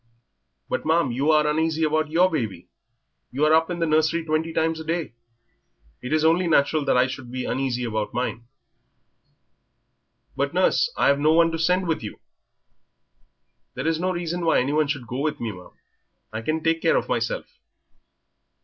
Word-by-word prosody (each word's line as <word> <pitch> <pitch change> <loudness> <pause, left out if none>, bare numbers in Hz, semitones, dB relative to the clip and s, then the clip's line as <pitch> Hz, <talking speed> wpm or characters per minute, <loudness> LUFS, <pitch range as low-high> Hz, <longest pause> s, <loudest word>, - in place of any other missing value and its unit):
"But, - - -2
ma'am, 160 -4 +2
you 135 +6 0
are 155 -1 +4
uneasy 160 +1 0
about 155 0 +1
your 175 +4 +4
baby; 110 - -3 0.6
you 140 +4 +1
are 155 - +4
up 160 +1 +3
in 175 - -3
the 165 - 0
nursery 160 +1 +1
twenty 155 +1 -1
times 160 0 0
a - - -6
day; 165 -4 -3 0.9
it 125 - -6
is 155 0 +2
only 170 +3 +3
natural 150 -1 +2
I 125 +1 +4
should 130 -1 -7
be 130 0 -4
uneasy 130 -2 -2
about 110 -1 -2
mine." 120 -1 -3 1.9
"But, - - -2
nurse, - - +2
I've 140 0 +3
no 155 +2 +3
one 165 0 +4
to 165 - -3
send 180 +2 +1
with 160 - -1
you." 105 - -8 1.6
"There 130 - -4
is 165 -1 0
no 185 +2 0
reason 175 0 -3
why 165 - +3
any 135 +3 -1
one 155 -1 +2
should 140 -4 -3
go 125 +3 -5
with 150 +1 -2
me, 115 -2 -3
ma'am; 90 -2 -12 0.6
I 110 - -3
can 155 +6 -2
take 165 0 +1
care - - +3
of - - -2
myself." - - -3
155 Hz, 175 wpm, -24 LUFS, 130-165 Hz, 1.9 s, are